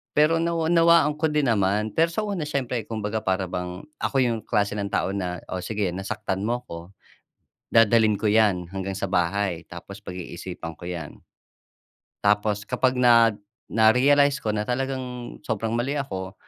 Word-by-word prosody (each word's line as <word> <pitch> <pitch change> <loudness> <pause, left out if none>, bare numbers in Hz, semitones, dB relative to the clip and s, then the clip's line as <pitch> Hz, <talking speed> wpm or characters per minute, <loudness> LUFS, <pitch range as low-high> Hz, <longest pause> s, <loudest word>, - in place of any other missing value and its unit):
Pero 155 +2 +4
nawa 165 -1 0
nawaan 165 -3 +5
ko 160 - +1
din 150 -2 +1
naman, 105 0 +1
pero 165 +10 +3
sa 215 - -1
una 195 -7 -3
siyempre 125 -5 -2
kumbaga 110 -1 -3
para 95 -1 0
bang 90 0 -5 0.2
ako - - -3
yung 115 -2 0
klase 100 0 0
ng 100 -1 -2
tao - - 0
na, 90 -3 -3
oh, 95 - -2
sige 105 -4 -2
nasaktan 95 +1 -3
mo 120 +2 -1
ko. 85 - -7 0.9
Dadalhin 110 -2 +4
ko 110 - -5
'yan 105 -4 +3
hanggang 95 0 -4
sa 100 - -2
bahay, 90 -1 0
tapos 100 +4 -10
pag-iisipan 90 -2 -7
ko 85 +2 -9
'yan. 85 -4 -7 1.0
Tapos 105 0 +1
kapag 125 +1 0
nag 115 -3 +5 0.3
na 110 0 +5
narealize 140 +3 +4
ko 110 - -3
na 105 - 0
talagang 125 0 -4
sobrang 110 0 -2
mali 130 +5 -1
ako, 95 -8 -5
110 Hz, 165 wpm, -24 LUFS, 95-130 Hz, 1.0 s, nawaan